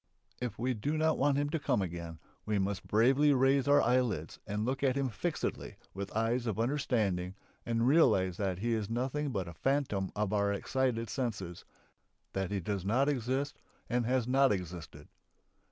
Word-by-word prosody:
If 120 -4 -3
we 125 +2 0
do 145 +8 -2
not 160 0 +2
want 140 0 +3
him 145 0 0
to 165 - 0
come 140 - +1
again 85 -3 -4 0.3
we 105 -1 0
must 95 0 -2
bravely 135 +7 +4
raise 135 +1 +3
our 145 0 +5
eyelids 115 -9 0
and 105 +1 -2
look 130 +2 -1
at 135 -2 +2
him 135 -2 0
fixedly 105 -4 -3 0.2
with 100 +1 -5
eyes 115 +2 0
of 110 -1 -2
understanding 110 -8 0 0.3
and 115 0 +1
realise 95 - +4
that 95 -3 -1
he 115 +5 -1
is 110 -2 -2
nothing 135 +5 -1
but 95 -8 -2
a 85 - -7
phantom 125 - 0
of 105 -1 -1
our 100 -1 +2
excited 115 +2 -1
senses, 105 -10 -4 0.7
that 95 -2 -1
he 100 - -1
does 95 +1 -3
not 125 +8 +2
exist 135 +2 -2 0.3
and 120 -1 +1
has 125 -2 +1
not 135 +1 +4
existed. 85 -6 -5
115 Hz, 175 wpm, -32 LUFS, 100-135 Hz, 0.7 s, our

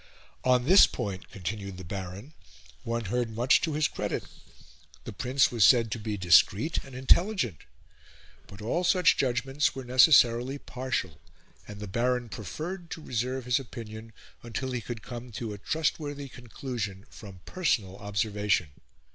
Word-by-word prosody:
On 125 -1 +3
this 190 +7 +8
point, 100 -6 -5
continued 100 0 -5
the 95 - -8
Baron, 95 - -7 0.5
one 115 -1 -3
heard 120 +4 -1
much 120 +4 +3
to 160 - -1
his 150 0 +2
credit; - - -3 0.8
the - - -7
Prince 125 +6 +2
was 115 -3 +2
said 115 -2 +5
to 115 - -3
be 105 -1 -3
discreet 95 - +4
and 135 -2 -12
intelligent; 130 - +2 0.9
but 100 +1 -11
all 165 +11 0
such 180 -1 +4
judgments 135 +3 0
were 135 - -5
necessarily 125 0 +5
partial, 130 - -4 0.5
and 105 -1 -9
the 105 - -6
Baron 120 +4 0
preferred 165 - -6
to - - -6
reserve 125 +1 -2
his 125 +1 +2
opinion 115 -3 -9 0.3
until 125 +3 -4
he 125 -2 -2
could 115 -1 -7
come 120 0 -8
to 110 0 -4
a 100 - -9
trustworthy 145 +1 -2
conclusion 115 -5 -6
from 95 -4 -12
personal 110 - -1
observation. 105 -4 0
120 Hz, 145 wpm, -28 LUFS, 105-130 Hz, 0.9 s, this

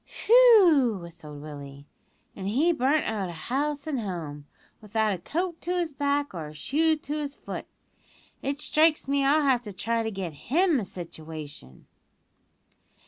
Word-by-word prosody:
"Whew!" 385 - +7
whistled 165 -4 -10
Willie, 140 -2 -9 0.5
"an' 190 -1 -5
he 290 +12 +3
burnt 285 +2 +2
out 205 -4 -2
o' - - -6
house 280 - -2
and 295 -5 -2
home, 160 -8 -5 0.3
without 215 0 0
a 185 - -5
coat 340 - -3
to 355 +1 -2
his 335 -4 -1
back 285 -1 0
or 165 -4 -5
a 150 - -11
shoe 315 - +1
to 295 -1 -6
his 295 -2 -3
foot. - - -7 0.7
It 280 +1 -2
strikes 310 0 +2
me 280 0 +1
I'll 295 +3 +4
have 260 -4 +3
to 215 -4 -8
try 230 +4 -1
to 225 - -2
get 190 -6 -5 0.2
him 335 0 +3
a 210 - -4
situation." 155 - -9
245 Hz, 160 wpm, -27 LUFS, -, 0.7 s, Whew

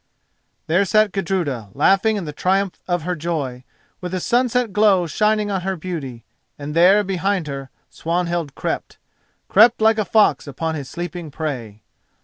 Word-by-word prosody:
_" - - -49 0.6
There 175 +5 +2
sat 215 +2 +3
Gudruda, 165 - -2
laughing 195 +3 +3
in 200 -4 -3
the 150 - -6
triumph 190 +4 0
of 175 -3 -1
her 180 +2 -2
joy, 145 -6 -4 0.4
with 180 0 -5
the 185 - -1
sunset 245 0 +1
glow 205 -4 +4
shining 210 +5 +1
on 190 -2 -1
her 190 +1 -2
beauty, 155 -9 -6 0.3
and 145 +1 -6
there, 190 +5 +5
behind 195 -1 -1
her, 135 -2 -6 0.2
Swanhild 170 -2 -2
crept—crept 225 +4 0
like 220 0 +3
a 215 - 0
fox 215 -7 +2
upon 160 +4 -3
his 140 -4 -6
sleeping 175 -1 -6
prey. 125 -9 -5
180 Hz, 155 wpm, -21 LUFS, 155-200 Hz, 0.6 s, there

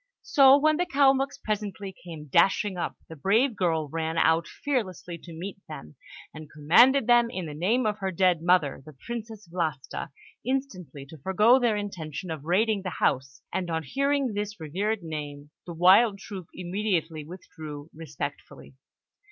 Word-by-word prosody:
So 275 -2 +6
when 310 +1 +3
the 355 +1 0
Kalmuks 275 -3 +3
presently 205 -2 -4
came 165 -4 -10
dashing 190 - +2
up, 175 - -3
the 160 - -10
brave 220 - +2
girl 165 -5 0
ran 160 +2 -3
out 165 +1 +3
fearlessly 190 - -3
to 170 - -12
meet 180 +5 -7
them, 75 - -9 0.4
and 155 -1 -10
commanded 225 - +5
them, 240 0 +4
in 185 -7 -5
the 150 - -6
name 210 +11 +1
of 215 -1 -1
her 195 -1 -2
dead 180 -2 +2
mother, 170 -6 +2
the 150 -1 -14
Princess 220 -4 -7
Vlasta, 160 -6 -4 0.3
instantly 185 - -4
to 155 +2 -13
forego 210 - +4
their 235 -4 +2
intention 180 -4 -5
of 155 -2 -6
raiding 205 +4 +2
the 185 - -4
house; 130 0 -1
and 180 -2 -2
on 160 -1 -2
hearing 275 - 0
this 205 0 -4
revered 195 +7 -2
name, 145 -2 -7 0.2
the 170 - -6
wild 195 +5 +5
troop 190 -3 -9
immediately 175 -4 -2
withdrew 155 -2 -10
respectfully. 150 - -7
185 Hz, 160 wpm, -27 LUFS, 160-220 Hz, 0.4 s, So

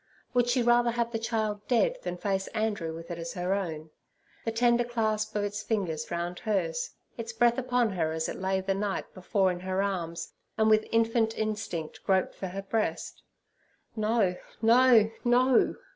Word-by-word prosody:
Would 245 -1 +3
she 245 0 +2
rather 240 0 +4
have 235 0 -1
the 225 - -2
child 215 -2 -2
dead - - +2
than 180 - -4
face 195 0 -1
Andrew 210 -7 -1
with 165 +1 -8
it 170 - -5
as 165 0 -5
her 180 +1 -1
own? 160 -5 -4 0.5
The 225 - 0
tender 240 +1 +3
clasp 220 -3 -1
of 205 - +1
its 205 +1 -3
fingers 200 -8 -2
round 175 +1 -3
hers; 175 -7 -1 0.3
its 230 0 -5
breath 235 +1 +3
upon 245 -3 +1
her 165 -4 -1
as 160 0 -1
it - - -5
lay 190 0 0
the 195 +1 0
night 195 0 -3
before 190 0 +1
in 175 - -5
her 190 +1 -1
arms, 170 -4 -3 0.2
and 220 0 +4
with 215 0 +4
infant 225 0 +2
instinct 205 -7 -3
groped 190 -1 +1
for 190 - -5
her 195 +2 -5
breast—no, 215 -1 -3 0.3
no, 230 -1 +6
no! 250 +1 +4
210 Hz, 175 wpm, -28 LUFS, 185-230 Hz, 0.5 s, no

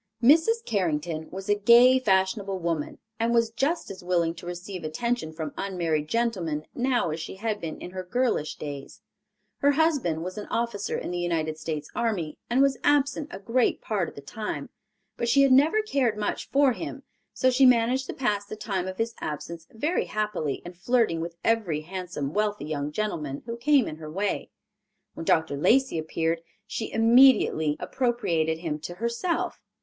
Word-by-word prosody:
Mrs. 330 - +5
Carrington 160 -5 -1
was 190 +1 -7
a 205 - +4
gay, 235 +5 +6
fashionable 195 -2 +1
woman, 165 -4 -2 0.2
and 230 +1 +1
was 230 -1 +3
just 280 - -1
as 190 -2 -10
willing 170 -2 +1
to 170 +1 -11
receive 180 +1 -6
attention 235 +3 -2
from 155 -2 -5
unmarried 170 -6 -1
gentlemen 185 -9 -1
now 245 -8 +1
as 155 - -4
she 165 - -6
had 215 +1 -3
been 160 -2 -5
in 180 - -8
her 185 0 -5
girlish 220 -5 0
days. 140 -2 -8 0.6
Her 285 0 +4
husband 275 - +1
was 185 +4 -5
an 210 - -7
officer 230 -3 -2
in - - -4
the 175 - -2
United 160 -3 -1
States 155 -2 -4
army 205 -10 -2
and 255 +3 +4
was 275 -2 +2
absent 290 0 +2
a - - -7
great 230 +5 +1
part 200 -6 -1
of - - -17
the 140 - -8
time, 150 -3 -5 0.5
but 235 - -1
she 275 +3 +5
had 275 - +4
never 310 +11 +5
cared 260 - 0
much 210 -1 -3
for 280 -1 +4
him, 270 +7 -6 0.3
so 255 - +2
she 260 +1 +6
managed 250 +2 +3
to - - -4
pass 210 -6 0
the 205 - -8
time 195 -4 -3
of 185 0 -5
his 230 0 -1
absence 165 +2 -5
very 295 +10 -1
happily 210 -9 -2
in 175 - -7
flirting 190 -2 +1
with 170 0 -5
every 210 -10 +1
handsome 175 -4 -5
wealthy 210 -5 0
young 150 -1 -3
gentleman 150 -8 -3
who 230 0 -4
came 275 +1 +3
in 155 - -6
her 155 -1 -8
way. 195 +6 -2 0.6
When 165 - -7
Dr. 160 -3 +2
Lacey 260 - +3
appeared, 165 +1 -1 0.2
she 220 +1 -4
immediately 225 - +5
appropriated 175 -11 0
him 160 -2 -3
to 175 +3 -7
herself. 235 - -2
200 Hz, 180 wpm, -26 LUFS, 165-240 Hz, 0.6 s, gay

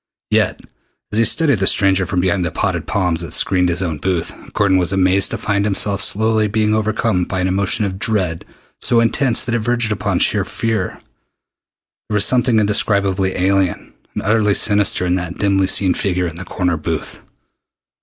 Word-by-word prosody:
Yet, - - +1 0.5
as 105 - 0
he 115 - +4
studied 145 - +2
the 95 - +1
stranger 95 -2 +2
from 90 - -1
behind 90 0 0
the 85 - -1
potted - - -2
palms 90 -4 -1
that 85 - -6
screened 90 -2 +2
his 85 +2 -1
own 80 -4 -3
booth. 90 +2 -2 0.2
Gordon 95 -3 +2
was 90 0 +1
amazed 95 0 +2
to - - -3
find 100 -1 -1
himself 100 -1 0
slowly 110 +1 +2
being 105 0 0
overcome 110 -3 0
by 95 +1 -3
an 90 - 0
emotion 100 +2 0
of 95 -1 -5
dread 95 -7 -1 0.4
so 120 - +3
intense 115 +1 +1
that 120 - -3
it 120 - +1
verged 120 0 0
upon 105 - -1
sheer - - +1
fear. 110 -5 -3 1.1
There 105 - -1
was 105 -1 +3
something 125 -2 +2
indescribably 100 -2 0
alien 95 -1 0 0.2
and - - -3
utterly 105 -1 +2
sinister 100 -3 +2
in 90 - 0
that 90 -1 -5
dimly 95 -2 +1
seen 95 -1 +2
figure 90 -2 -1
in 85 -2 -5
the 95 - -8
corner 90 -3 -1
booth. 75 - -5
100 Hz, 185 wpm, -17 LUFS, 90-110 Hz, 1.1 s, he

